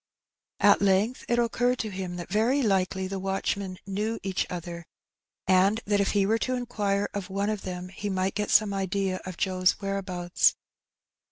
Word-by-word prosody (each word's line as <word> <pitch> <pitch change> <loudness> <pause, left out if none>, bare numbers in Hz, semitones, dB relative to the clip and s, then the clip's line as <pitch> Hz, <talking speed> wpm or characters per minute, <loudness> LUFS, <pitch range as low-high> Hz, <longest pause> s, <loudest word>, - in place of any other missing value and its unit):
At - - +6
length 200 +5 +2
it 240 - +2
occurred 245 +1 +1
to 215 - -4
him 185 -2 -5
that 175 -1 -6
very 240 +7 +2
likely 190 -2 +1
the 195 0 -4
watchmen 195 0 -2
knew 210 +3 -2
each 190 -1 -1
other, 170 -1 -6 0.6
and 190 +3 +4
that 205 0 +2
if 200 - +1
he 200 -2 +3
were 220 +3 +2
to 255 +2 -1
inquire 205 -5 -1
of 200 -1 -4
one 200 +2 -1
of 210 -2 -3
them 180 -1 -6
he 200 +2 -5
might 190 0 0
get 210 0 -2
some 210 -2 +4
idea 195 -1 -1
of 185 -2 -6
Joe's 185 -1 +2
where 195 0 -2
abouts. 180 -2 +1
195 Hz, 180 wpm, -27 LUFS, 185-210 Hz, 0.6 s, At